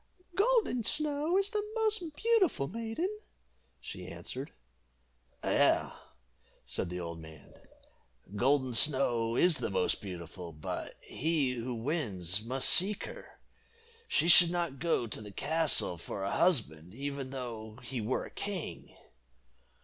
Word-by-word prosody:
"Golden 410 - +2
Snow 300 - +1
is 395 +1 +1
the 425 - 0
most 430 -8 -1
beautiful 415 - +2
maiden," 230 - -3 0.7
she - - -8
answered. 135 +5 -6 0.9
"Yes," - - +2 0.7
said 90 - -3
the 90 0 -5
old 85 -1 -6
man, 80 -2 -13 0.8
"Golden 130 +3 +2
Snow 120 -2 +3
is 175 +4 +4
the - - -2
most 95 -2 0
beautiful, 85 -2 -8
but 75 0 -6
he 155 -3 -1
who 120 0 -4
wins 110 - 0
must 130 +3 0
seek 200 +3 +7
her. - - -10 0.7
She 165 - +2
should 175 0 +9
not 170 -6 -2
go 165 -7 +1
to 110 - -6
the 105 -1 -9
castle 145 - 0
for 95 +3 -6
a 100 - -2
husband, 95 - 0
even 140 0 -5
though 115 -4 -7
he 125 -1 -4
were 115 +5 -1
a - - -11
king." 195 -5 -6
135 Hz, 130 wpm, -31 LUFS, -, 0.9 s, should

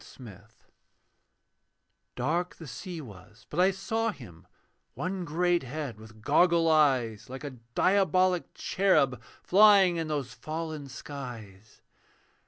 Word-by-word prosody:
THE - - -16 0.2
FISH 105 -6 -13 1.7
Dark 165 +8 -1
the 165 - -11
sea 160 +6 -7
was: 105 -3 -14
but 155 - -3
I 185 +1 +5
saw 225 +4 -1
him, 90 - -11 0.5
One 185 0 -3
great 175 +2 +1
head 130 -3 -6
with 110 -1 -15
goggle 170 +2 +3
eyes, 130 -7 +2
Like 130 +3 -8
a 135 -4 -8 0.2
diabolic 185 -2 +2
cherub 155 -10 +1 0.2
Flying 195 -3 +6
in 165 -1 -2
those 145 -4 -3
fallen 155 -2 -6
skies. 115 -8 -10
155 Hz, 120 wpm, -28 LUFS, 125-180 Hz, 1.7 s, Flying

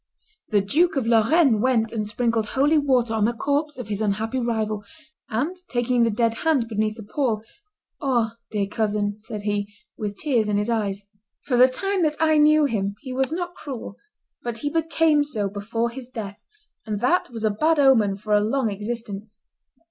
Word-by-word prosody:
The 205 -2 +3
Duke 310 - +2
of 265 -4 0
Lorraine 230 +2 +4
went 230 -3 +2
and 215 -2 -2
sprinkled 230 0 0
holy 290 +6 +3
water 255 -5 +2
on 215 -2 +2
the 235 - +1
corpse 290 +4 -1
of 250 -5 -6
his 205 0 -2
unhappy 220 +4 -1
rival, 220 -3 -1 0.5
and, 275 +12 -1
taking 245 0 +1
the 230 - +4
dead 230 +1 +1
hand 295 -8 +2
beneath 215 0 -1
the 220 - -8
pall, 220 -1 -1 0.6
"Ah! 235 -5 0
dear 205 -2 -1
cousin," 205 0 -1
said 210 -1 -7
he, 205 0 -1 0.3
with 205 -2 -4
tears 240 -8 +1
in 205 - +1
his 210 +3 0
eyes. 205 -3 -2 0.4
For 255 - 0
the 250 +1 +7
time 390 +9 -1
that 305 -2 +2
I 315 -1 +4
knew 305 0 +5
him 200 -6 -1
he 260 -3 -6
was 265 +3 0
not 350 +1 -3
cruel; 260 - -7 0.5
but 240 -1 -4
he 290 - 0
became 325 -2 +2
so 220 -9 -2
before 225 +4 -2
his 250 0 -8
death, 205 -5 -7 0.4
and 210 -2 -3
that 345 +9 +2
was 230 -2 -6
a 215 - +3
bad 310 +9 +2
omen 230 -8 +4
for 210 +2 -3
a 210 - +5
long 225 +1 0
existence. 210 0 -6
230 Hz, 185 wpm, -23 LUFS, 210-275 Hz, 0.6 s, the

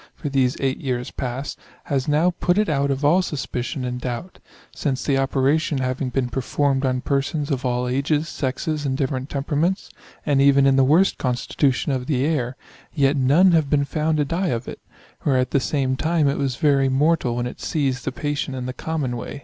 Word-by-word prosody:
8^ 145 - -2
these 130 -2 +1
8 135 -1 -1
years 125 -2 -3
past, 130 +3 -5 0.2
has 135 -3 -1
now 155 +4 +3
put 175 +1 +2
it 210 0 +2
out 140 -2 +1
of 140 +1 -1
all 170 +6 +5
suspicion 135 -4 -3
and 125 0 -4
doubt; 125 +9 -5 0.4
since 135 -4 -2
the 140 - +1
operation 140 +3 +1
having 130 0 -1
been 125 0 -1
performed 135 +2 0
on 130 -1 0
persons 145 +2 -1
of 130 -2 -1
all 125 0 -1
ages, 145 +5 0
sexes, 145 +2 -3
and 135 -2 -1
different 135 -1 -2
temperaments, 150 +7 -1 0.3
and 140 -2 +3
even 140 0 +5
in 135 -1 +4
the 135 - +5
worst 165 +9 +3
constitution 130 +2 0
of 130 -1 -2
the 135 -3 +1
air, 135 -5 -1 0.4
yet 140 -1 +3
none 145 +8 +4
have 160 -4 +2
been 140 -1 +2
found 155 +1 0
to 150 - +2
die 175 +6 -1
of 120 -6 -2
it; - - -7 0.4
where 135 -3 +2
at 125 0 0
the 140 - +3
same 130 -1 0
time 155 +1 +1
it 140 - 0
was 135 -3 -1
very 140 -1 +3
mortal 135 -2 +2
when 120 0 -1
it 125 - -7
seized 135 -5 -1
the - - -2
patient 140 -3 -3
the 130 - -4
common 145 -3 -3
way. 120 +4 -6
140 Hz, 200 wpm, -22 LUFS, 130-150 Hz, 0.4 s, all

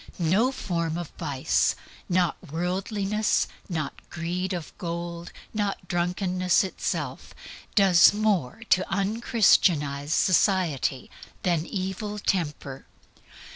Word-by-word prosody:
No 190 +10 +2
form 170 -9 -2
of 175 -3 -6
vice, 145 -6 +1 0.3
not 180 -2 +2 0.2
worldliness, 195 +5 0 0.2
not 155 -5 -2 0.2
greed 175 +2 -3
of 175 -4 -5
gold, 170 -1 -5 0.2
not 205 -2 -2
drunkenness 180 +1 +1
itself, 190 - -4 0.4
does 190 -4 +7
more 205 - 0
to 185 +1 +3
un 200 +4 -1
Christianize 150 - +3
society 170 -8 +2 0.3
than 170 -3 +1
evil 195 +2 -4
temper. 150 -9 -2
180 Hz, 95 wpm, -26 LUFS, 165-195 Hz, 0.4 s, does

